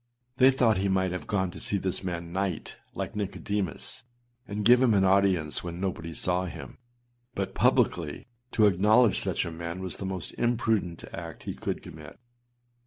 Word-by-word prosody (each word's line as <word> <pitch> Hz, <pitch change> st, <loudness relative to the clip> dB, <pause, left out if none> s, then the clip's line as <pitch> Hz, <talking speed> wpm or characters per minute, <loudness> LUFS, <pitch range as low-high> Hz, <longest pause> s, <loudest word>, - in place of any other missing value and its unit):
They 130 Hz, 0 st, +7 dB
thought 120 Hz, -6 st, +3 dB
he 100 Hz, +1 st, +1 dB
might 95 Hz, -1 st, +1 dB
have 90 Hz, -, -5 dB
gone 95 Hz, -3 st, 0 dB
to -, -, -9 dB
see 100 Hz, -, 0 dB
this 95 Hz, 0 st, 0 dB
man 85 Hz, -2 st, -4 dB
night, 95 Hz, -4 st, -2 dB, 0.2 s
like -, -, -4 dB
Nicodemus, 100 Hz, -2 st, -3 dB, 0.5 s
and 105 Hz, 0 st, -3 dB
give 125 Hz, +2 st, +7 dB
him 120 Hz, -5 st, +4 dB
an 95 Hz, -, +4 dB
audience 95 Hz, -5 st, +3 dB
when 85 Hz, 0 st, -5 dB
nobody 90 Hz, -3 st, -3 dB
saw 90 Hz, 0 st, +1 dB
him; 90 Hz, -, -8 dB, 0.6 s
but 95 Hz, -1 st, -2 dB
publicly 80 Hz, -4 st, +1 dB, 0.3 s
to 110 Hz, -, +5 dB
acknowledge 105 Hz, +4 st, +4 dB
such -, -, -1 dB
a 85 Hz, -, -4 dB
man 85 Hz, +2 st, -5 dB
was 95 Hz, -2 st, -4 dB
the 95 Hz, -, -4 dB
most 95 Hz, -3 st, -4 dB
imprudent 115 Hz, -7 st, 0 dB
act -, -, -7 dB
he -, -, -4 dB
could -, -, -4 dB
commit. 75 Hz, -2 st, -11 dB
95 Hz, 175 wpm, -28 LUFS, 85-105 Hz, 0.6 s, They